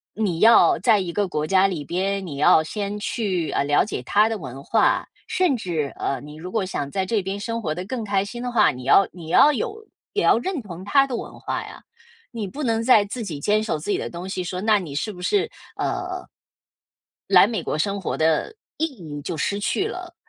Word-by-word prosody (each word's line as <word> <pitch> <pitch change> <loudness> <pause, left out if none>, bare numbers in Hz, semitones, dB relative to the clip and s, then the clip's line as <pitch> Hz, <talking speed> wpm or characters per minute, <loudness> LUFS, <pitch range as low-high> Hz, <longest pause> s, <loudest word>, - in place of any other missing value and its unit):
你 195 -6 -1
要 230 +4 +6
在 225 -4 +4
一 175 -3 -3
个 205 +1 0
国 150 -4 -2
家 190 +4 +4
里 165 -7 -4
边， 195 +3 -1
你 145 -5 -6
要 155 +2 +5
先 205 +4 -4
去， 195 -6 -2
呃， - - +1
了 145 +1 +3
解 205 - -4
它 205 - +3
的 225 -1 -3
文 135 -3 -8
化， 225 - +2 0.2
甚 360 -7 +2
至， 165 - -3
呃， 135 - -2
你 150 +1 -11
如 180 +3 -8
果 220 -4 0
想 145 -6 -3
在 190 +6 -1
这 210 +2 0
边 195 +2 -4
生 230 +2 -3
活 155 -7 -2
得 180 - -5
更 235 +3 -4
开 200 -2 0
心 240 +4 -7
的 250 0 -3
话， 220 -3 +4
你 125 0 -9
要 195 +8 +5
你 170 -3 -10
要 290 - +6
有 445 - -4 0.3
也 410 - 0
要 - - +5
认 360 +5 -3
同 180 -3 -9
它 275 +7 +4
的 265 -3 -4
文 - - -8
化 - - -3
呀。 - - -11 0.5
你 225 -3 -4
不 290 - -7
能 225 -3 +1
再 230 -4 +5
自 230 +4 -5
己 165 -8 -5
坚 210 +8 +1
守 210 -8 -2
自 155 - -7
己 - - +1
的 - - -4
东 175 +2 -7
西。” 190 -1 -3
说： 180 +1 -4
“那 215 +2 +3
你 170 -8 -6
是 150 +9 -2
不 180 - -11
是， 395 - +1 0.6
呃” 365 0 -6 1.0
“来 - - +7
美 230 - -3
国 - - -2
生 200 +5 -1
活 190 - -3
的 160 - +1 0.2
意 320 - +1
义 165 - -8
就 165 - -4
失 200 +7 -1
去 390 - 0
了。” 365 -5 -7
200 Hz, 250 characters per minute, -23 LUFS, 170-230 Hz, 1.0 s, 来